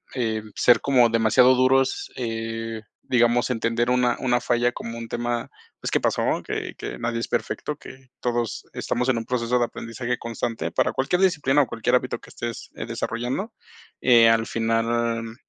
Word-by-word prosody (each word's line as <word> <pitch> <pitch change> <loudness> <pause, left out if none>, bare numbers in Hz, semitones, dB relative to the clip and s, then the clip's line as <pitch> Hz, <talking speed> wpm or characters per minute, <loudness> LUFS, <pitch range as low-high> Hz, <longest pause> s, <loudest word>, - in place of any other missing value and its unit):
eh, 110 -4 -1
ser 120 - +5
como 125 -4 +4
demasiado 115 +3 +5
duros, 130 +1 +2
eh, 115 -1 -4 0.2
digamos 120 0 +2
entender 115 0 0
una 125 -1 +2
una 125 -2 +2
falla 120 0 +1
como 115 0 -6
un 115 0 -6
tema, 120 0 -2 0.3
pues, - - -3
que - - +3
pasó, - - +1
que - - -4
que - - -6
nadie 115 0 -2
es 115 - -3
perfecto, 150 - -2
que 130 -3 -13
todos 120 -4 -2
estamos 125 +1 -1
en 125 - +2
un 115 - -6
proceso 125 0 0
de 120 - +3
aprendizaje 120 +1 -4
constante 115 0 -3
para - - +1
cualquier 155 +8 0
disciplina 145 -7 +3
o - - -5
cualquier 120 +3 0
hábito 125 0 -1
que - - -15
estés 120 -1 -6
desarrollando. 125 - -3 0.5
Eh, 115 -3 +6
al 115 0 +3
final, 115 0 -1
120 Hz, 165 wpm, -24 LUFS, 115-125 Hz, 0.5 s, Eh